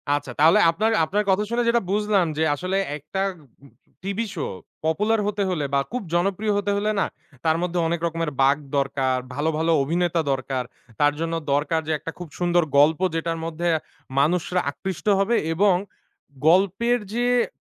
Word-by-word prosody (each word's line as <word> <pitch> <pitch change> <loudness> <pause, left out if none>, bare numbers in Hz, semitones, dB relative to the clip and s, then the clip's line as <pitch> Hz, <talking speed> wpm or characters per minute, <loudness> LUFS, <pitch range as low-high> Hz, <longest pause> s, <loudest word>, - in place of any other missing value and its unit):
আচ্ছা, 145 -3 -4
তাহলে 160 +3 +6
আপনার 215 +6 0
আপনার 205 +5 0
কথা 190 +2 +3
শুনে 240 +1 +1
যেটা 235 0 +3
বুঝলাম 205 -3 +2
যে, 160 - +2
আসলে 185 +4 -2 0.2
একটা 190 +7 -4 0.4
উগ 140 - -17 0.3
টিভি 200 +4 -2
শো 155 - -2 0.4
পপুলার 210 +7 +1
হতে 205 -1 -1
হলে 155 -6 -1
বা 140 - +4
খুব 250 0 -2
জনপ্রিয় 195 +4 +1
হতে 205 0 0
হলে 210 +1 0
না, - - +2 0.4
তার 160 0 +3
মধ্যে 180 0 -1
অনেক 170 0 -1
রকমের 165 -1 -2
বাঁক 140 +2 +4 0.2
দরকার, 135 -1 0 0.2
ভালো, 150 +4 0
ভালো 165 +1 +1
অভিনেতা 170 +2 0
দরকার, 130 -1 -2 0.4
তার 145 0 +4
জন্য 165 0 -2 0.2
দরকার 155 +3 +1
যে - - -1
একটা 165 - -6
খুব 175 -2 -7
সুন্দর 175 -1 +3
গল্প 155 +3 +5 0.2
যেটার 165 0 -1
মধ্যে 165 +1 -3 0.5
মানুষরা 180 +4 +1
আকৃষ্ট 190 +5 -6
হবে, 225 +4 +2 0.2
এবং 195 +1 +4 0.7
গল্পের 200 +7 +3
যে 240 +1 0 0.2
স - - -20
175 Hz, 170 wpm, -23 LUFS, 155-200 Hz, 0.7 s, তাহলে